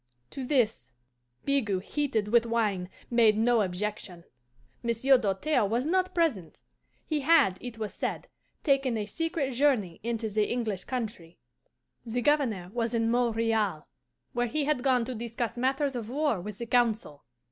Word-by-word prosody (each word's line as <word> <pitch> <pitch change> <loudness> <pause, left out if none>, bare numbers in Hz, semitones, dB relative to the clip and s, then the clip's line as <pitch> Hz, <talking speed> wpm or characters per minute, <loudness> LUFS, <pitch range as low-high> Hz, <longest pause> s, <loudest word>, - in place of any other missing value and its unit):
To 270 - -5
this, 225 - 0 0.5
Bigot, 215 -10 +1
heated 230 -8 -1
with 235 +1 +4
wine, 210 -6 0 0.2
made 225 -3 +5
no 230 +1 +3
objection. 185 -2 -4 0.6
Monsieur 235 +3 +3
Doltaire 225 +5 +1
was 235 +5 0
not 370 +3 +1
present; 255 - 0 0.5
he 305 -2 -1
had, 270 - +4
it 245 -2 -7
was 215 -2 -4
said, - - -3 0.4
taken 270 -5 +2
a 210 - -2
secret 325 - -2
journey 245 - +1
into 230 0 -2
the 210 0 0
English 220 -6 -2
country. 215 -9 -5 0.7
The 245 +1 -3
Governor 230 -12 +1
was 235 -1 -1
in 230 0 +1
Montreal, 225 -7 +1 0.5
where 245 -1 0
he 295 +6 0
had 300 -4 +1
gone 250 -3 +2
to 255 - -4
discuss 235 -1 -4
matters 270 +2 0
of 230 -2 -4
war 280 - 0
with 205 +1 -7
the 235 - -5
Council. 230 - 0
235 Hz, 150 wpm, -28 LUFS, 210-265 Hz, 0.7 s, made